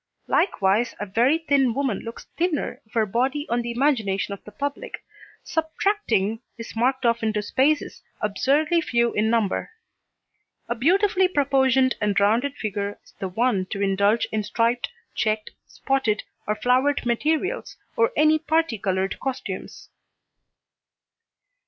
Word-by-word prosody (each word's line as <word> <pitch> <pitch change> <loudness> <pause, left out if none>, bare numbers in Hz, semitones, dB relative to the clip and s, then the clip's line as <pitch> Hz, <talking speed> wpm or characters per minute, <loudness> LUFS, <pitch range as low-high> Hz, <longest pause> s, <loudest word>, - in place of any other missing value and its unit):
Likewise 225 - +1
a 205 - -3
very 235 +10 +3
thin 280 -7 +2
woman 270 -8 0
looks 230 0 -8
thinner 335 -3 -1
if - - -28
her 225 -2 +3
body 260 +8 0
on 240 +1 +1
the 235 - -5
imagination 235 -7 0
of 200 - -10
the 210 - -12
public 285 - -5 0.4
subtracting 315 - 0 0.2
is 230 0 -8
marked 255 +3 +1
off 235 0 +2
into 215 -2 0
spaces 285 +8 +1 0.2
absurdly 285 +10 +2
few 235 -5 +1
in 215 +1 +1
number. 225 - 0 1.0
A - - 0
beautifully 370 - +3
proportioned 265 -4 +3
and 210 -1 +2
rounded 230 +8 +2
figure 205 -1 -3
is - - -22
the 190 - -3
one 200 -2 0
to 195 - -5
indulge 200 +3 +2
in 215 - 0
striped, 230 +3 0 0.2
checked, 215 -1 -1 0.2
spotted 265 -6 -1 0.2
or 210 - +1
flowered 255 +5 +2
materials 305 - -1 0.2
or 460 0 +3
any 310 +1 +5
parti 315 -6 0
coloured 190 -1 -1
costumes. 255 -8 -5
240 Hz, 135 wpm, -24 LUFS, 210-285 Hz, 1.0 s, any